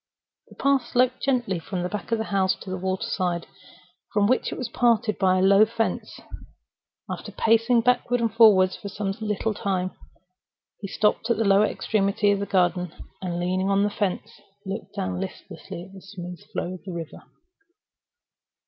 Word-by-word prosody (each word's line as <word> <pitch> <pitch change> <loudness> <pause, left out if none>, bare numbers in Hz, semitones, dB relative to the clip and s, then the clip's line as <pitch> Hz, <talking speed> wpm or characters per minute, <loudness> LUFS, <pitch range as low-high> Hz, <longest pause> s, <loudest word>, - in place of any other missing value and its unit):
The - - -15
path 275 -3 +2
sloped 255 +1 +1
gently 240 -9 0
from 180 +1 -4
the - - 0
back 205 +3 -6
of 230 - +3
the 220 - -1
house 190 -1 +3
to 190 - -7
the 185 - -2
water 190 0 -2
side, 175 -3 -1 0.7
from 205 -1 +2
which 255 +5 +1
it - - -5
was 255 - -3
parted 230 -3 +1
by 185 -1 +3
a 185 - +2
low 195 +1 +6
wooden 215 +2 +4
fence. 225 -1 -2 0.9
After - - -6
pacing 230 +1 +3
backward 245 0 +2
and 230 -2 0
forward 205 -5 +6
slowly - - -9
for 200 - -5
some 200 0 -3
little 215 +1 -1
time, 185 -2 -1 0.9
he 200 - -5
stopped 210 +3 +1
at 235 - +2
the 225 - +1
lower 200 +1 +5
extremity 205 -1 +1
of 200 - +1
the 200 - -3
garden, 180 -2 +1 0.3
and, 175 -2 -3
leaning 185 +2 0
on 200 0 +3
the 205 - +1
fence, 205 0 -3 0.2
looked 195 +3 -6
down 90 -1 -2
listlessly 170 - -7
at 190 +1 -14
the 190 - -11
smooth 180 -3 -8
flow 180 - -3
of 185 - -10
the 190 - -7
river. 165 -2 -7
200 Hz, 185 wpm, -25 LUFS, 185-225 Hz, 0.9 s, low